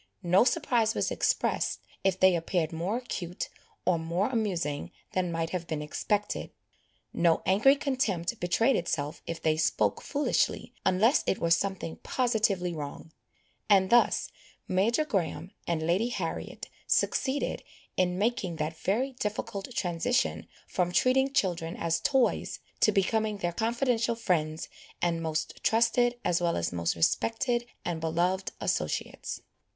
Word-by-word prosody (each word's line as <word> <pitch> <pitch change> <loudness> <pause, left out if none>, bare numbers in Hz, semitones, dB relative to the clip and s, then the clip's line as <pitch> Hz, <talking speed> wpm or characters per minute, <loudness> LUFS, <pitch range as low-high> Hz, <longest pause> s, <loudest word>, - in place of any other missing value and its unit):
No 180 +4 +5
surprise 230 -3 +2
was - - 0
expressed, - - 0 0.2
if 190 -1 +1
they 185 -1 +6
appeared 165 -1 -1
more 175 +8 -1
acute 180 -8 -5 0.4
or 175 -2 +3
more 170 +6 0
amusing 180 - -1 0.2
than 180 -2 0
might 165 0 -2
have 175 -2 -3
been 155 -2 -3
expected, 205 +7 -1 0.6
no 170 -1 +3
angry 220 +9 +5
contempt 235 - -1
betrayed 230 +9 +2
itself 150 -3 -2
if 165 0 -4
they 155 -1 +1
spoke 105 -10 +1
foolishly, 290 0 0
unless 205 +9 +4
it 190 - +2
were 170 - -1
something 175 -1 0
positively 215 -8 0
wrong; 150 +1 -7 0.6
and 190 -2 +5
thus 240 0 +4 0.4
Major 225 +11 +2
Graham 175 - -2 0.2
and 160 -2 0
Lady 185 +8 +2
Harriet 245 - -4 0.2
succeeded 275 +1 +1 0.3
in 180 -1 +1
making 205 -4 0
that 155 0 -3
very 230 +11 0
difficult 210 -4 -4
transition 180 +8 0 0.2
from 175 -1 0
treating 265 +6 +3
children 175 - 0
as 165 -1 0
toys, 265 +5 +1 0.2
to 215 - +5
becoming 215 +2 +1
their 175 -3 -2
confidential 235 +1 +1
friends, 160 -8 -1 0.3
and 170 -1 0
most 160 -1 -2
trusted, 235 +2 +3
as 175 -1 +2
well 170 -1 +1
as 85 +1 -1
most 85 -1 0
respected 235 - +1 0.2
and 165 -2 -2
beloved 175 +4 0
associates. - - -2
185 Hz, 135 wpm, -29 LUFS, 165-230 Hz, 0.6 s, they